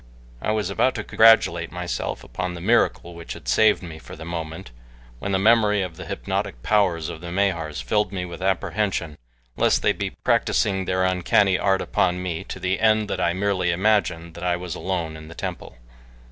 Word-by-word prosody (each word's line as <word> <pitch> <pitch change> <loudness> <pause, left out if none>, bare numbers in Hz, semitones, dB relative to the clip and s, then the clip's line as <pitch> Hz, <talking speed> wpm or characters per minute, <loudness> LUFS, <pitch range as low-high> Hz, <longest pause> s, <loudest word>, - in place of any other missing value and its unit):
I - - -2
was 105 -3 -1
about 130 +6 +2
to 105 - -3
congratulate 100 -7 +4
myself 90 -1 -4
upon 90 -1 -4
the - - -7
miracle 95 -3 +1
which 85 0 -7
had - - -12
saved 110 -3 +4
me 80 -2 -8
for - - -11
the 80 - -9
moment, 80 -5 -6 0.5
when 100 - -3
the 95 - +2
memory 105 -1 +4
of 90 -3 -6
the - - -9
hypnotic - - -3
powers 90 -7 +2
of 80 -2 -7
the 85 -1 -7
Mahars 85 -7 -1
filled 105 - 0
me 90 -2 -3
with 85 0 -9
apprehension 95 -3 -1 0.4
lest - - +2
they - - +4
be - - -3
practicing 95 -2 +1
their 95 0 0
uncanny 95 +1 +2
art 95 -1 +2
upon 90 0 +1
me 90 -3 -3
to - - -7
the 95 +1 -1
end 110 -1 +3
that - - -2
I 85 - +2
merely 95 -1 0
imagined 85 -3 +1
that 85 - -9
I 90 -1 +1
was 90 -1 -5
alone 85 -4 -3
in 80 0 -10
the 85 - -11
temple. - - -6
90 Hz, 195 wpm, -23 LUFS, 85-100 Hz, 0.5 s, congratulate